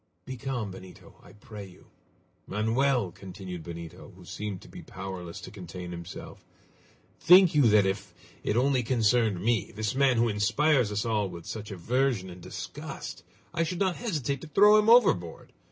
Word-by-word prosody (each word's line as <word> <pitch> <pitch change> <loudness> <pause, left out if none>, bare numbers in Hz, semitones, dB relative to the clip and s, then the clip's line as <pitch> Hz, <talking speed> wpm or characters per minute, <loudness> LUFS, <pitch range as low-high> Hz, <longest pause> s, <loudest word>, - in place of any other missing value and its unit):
"Be 130 - -6
calm, 125 -5 -4
Benito, 95 0 -13
I - - -16
pray 105 0 -10
you!" 90 -1 -19 0.6
"Manoel!" 115 0 +1
continued 90 -1 -8
Benito, 85 -1 -9
who - - -15
seemed 105 -3 -5
to - - -14
be - - -10
powerless 95 -3 -7
to - - -9
contain 90 -3 -8
himself, 85 +1 -9 0.8
"think 180 +2 +7
you 145 -5 +5
that 105 -2 +5
if 95 0 -2 0.3
it 105 - 0
only 130 0 +3
concerned 115 -4 +2
me 115 +3 0
this 110 0 -2
man 135 -2 +3
who 120 +1 +3
inspires 115 +4 +2
us 105 +1 -1
all 105 -4 0
with 85 -2 -9
such 105 -1 -6
aversion 110 +1 -1
and 90 0 -11
disgust - - -7 0.3
I 165 - 0
should 170 +2 -1
not 190 -2 0
hesitate 145 - -2
to - - -9
throw 210 +7 +6
him 215 +1 +2
overboard! 185 - +3
110 Hz, 170 wpm, -28 LUFS, 95-135 Hz, 0.8 s, think